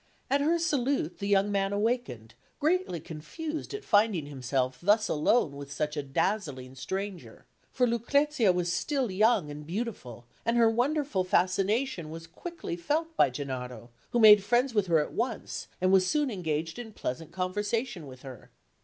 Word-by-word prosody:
At 280 +1 +3
her 325 +4 +3
salute, 280 - 0
the 200 - -3
young 200 0 +3
man 195 -1 0
awakened, 205 - -2 0.3
greatly 320 - +1
confused 300 - -6
at 415 - -6
finding 205 -7 +3
himself 130 -2 -2
thus 210 +4 +3
alone 155 0 +2
with 140 0 -8
such 150 +1 -2
a 145 - -1
dazzling 140 -3 -2
stranger; 190 +7 -6 0.3
for 250 - +2
Lucrezia 245 0 +2
was 175 -1 -1
still 270 - -1
young 200 -5 +2
and 150 +1 -8
beautiful, 165 - -5 0.2
and 230 +1 +1
her 230 -1 +5
wonderful 265 -3 0
fascination 185 - +1
was 165 +1 -8
quickly 325 - -6
felt 315 - -2
by - - +5
Gennaro, 125 -2 -6 0.2
who 240 - 0
made 210 -3 +9
friends 240 +4 +2
with 205 -3 +1
her 165 -2 +4
at 150 - -1
once, 235 -1 -3
and 185 +1 +2
was 190 -1 +5
soon 295 +3 +1
engaged 160 -2 -3
in 225 -3 -8
pleasant 155 +2 -5
conversation 205 - -2
with 130 -1 -12
her. 130 -4 -10
195 Hz, 160 wpm, -29 LUFS, 150-240 Hz, 0.3 s, made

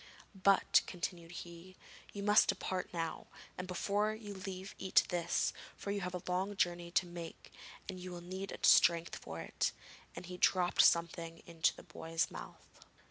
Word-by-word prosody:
'But,' 195 0 +4
continued 170 -1 -4
he, 175 +1 -9 0.4
'you 200 - -5
must 210 +1 +6
depart 185 -1 -1
now, 165 -2 -3 0.3
and, 185 - -5
before 205 +4 0
you 210 -2 -8
leave 190 0 -6
eat 190 - +4
this, 170 -1 0 0.2
for 200 - -4
you 200 0 -1
have 180 0 -3
a 180 - -5
long 190 +3 0
journey 175 -2 0
to 175 +1 +2
make 175 -1 -9 0.3
and 190 -2 -5
you 180 0 -7
will 175 -1 -6
need 190 +3 -5
strength 170 -1 +5
for - - -7
it;' - - -1 0.4
and - - -7
he 180 +1 -7
dropped 180 -1 +4
something 170 0 +2
into 165 -1 +1
the - - -12
boy's 165 0 -2
mouth. - - -11
180 Hz, 165 wpm, -35 LUFS, 170-195 Hz, 0.4 s, must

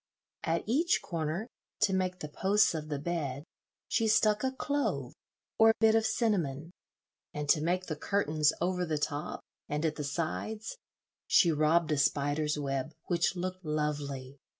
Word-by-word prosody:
At 165 +1 0
each 300 +10 +2
corner, 165 +3 -2 0.4
to 195 - +3
make 185 -1 -1
the 150 - -4
posts 195 +7 +3
of 155 -1 -5
the 145 - -1
bed, 145 -3 -3 0.4
she 225 - +1
stuck 215 0 +3
a 260 - +1
clove 285 +2 -2 0.5
or 225 0 +7
bit 220 -1 +5
of 225 0 +3
cinnamon, 170 - 0 0.6
and 150 0 -3
to 150 - +5
make 180 +3 0
the 155 - -3
curtains 155 -4 +1
over 180 +1 0
the 160 -3 -1
top 145 0 -3 0.3
and 150 +2 -1
at 155 -1 -1
the 150 - -3
sides 175 - -3 0.5
she 170 - +5
robbed 155 +1 +2
a 150 - +1
spider's 145 +2 +1
web, 135 0 -2 0.2
which 175 +1 +1
looked 185 +1 -4
lovely. 145 -3 -3
165 Hz, 155 wpm, -31 LUFS, 150-195 Hz, 0.6 s, or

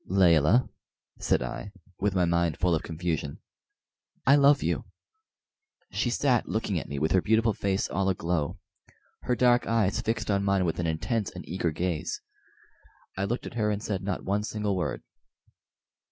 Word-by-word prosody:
"Layelah," 90 - +4 0.5
said - - +1
I, 65 +10 -6 0.3
with 100 -1 0
my 90 -1 +3
mind 85 -2 +1
full 90 -1 +2
of 80 - +1
confusion. 80 -3 -3 0.9
"I 140 - +7
love 140 0 +5
you!" - - -1 1.1
She 120 - 0
sat 125 -1 +1
looking 105 -5 -1
at - - -9
me 70 - -4
with 80 +3 0
her 95 - +4
beautiful 110 +2 +2
face 100 +1 -1
all 95 +1 0
aglow 85 -5 -1 0.6
her 125 - 0
dark 120 0 +3
eyes 110 -3 +1
fixed 110 -1 -1
on 100 0 +1
mine 100 -2 +2
with 80 - -1
an 85 - 0
intense 95 +7 -1
and - - -10
eager 90 0 -1
gaze. 85 0 -2 1.0
I 95 - -1
looked 120 +5 -3
at - - -7
her 110 -2 0
and 105 0 -2
said 95 -3 -2
not 95 -1 -3
one 100 +2 +1
single 105 -2 -2
word. 90 - -2
95 Hz, 170 wpm, -27 LUFS, 85-110 Hz, 1.1 s, I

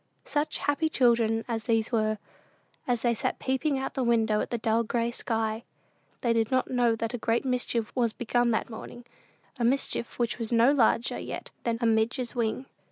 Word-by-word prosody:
Such 295 0 -1
happy 290 +3 0
children 230 -5 +2
as 225 -2 -3
these 225 -1 +1
were, 215 -2 +1 0.7
as 245 -2 0
they 240 -1 +3
sat 225 - -2
peeping 270 +2 0
out 265 - -3
of - - -37
the 265 - -1
window 225 -3 +2
at - - -3
the 240 - -1
dull 225 0 +1
gray 235 +1 -1
sky! 225 -1 -2 0.6
They 235 -2 +2
did 225 -1 +1
not 260 0 0
know 240 -2 +3
that 230 +1 -3
a 245 - -3
great 230 +3 0
mischief 245 -3 -1
was 240 -3 +2
begun 240 +1 0
that 225 - 0
morning 240 +1 -9 0.5
a - - 0
mischief 240 -1 0
which 235 -2 -1
was 230 0 -2
no 235 +3 +5
larger 240 -3 +2
yet - - -6
than 230 -1 0
"a - - +1
midge's 225 +2 +1
wing." 235 +2 -1
235 Hz, 195 wpm, -28 LUFS, 225-250 Hz, 0.7 s, no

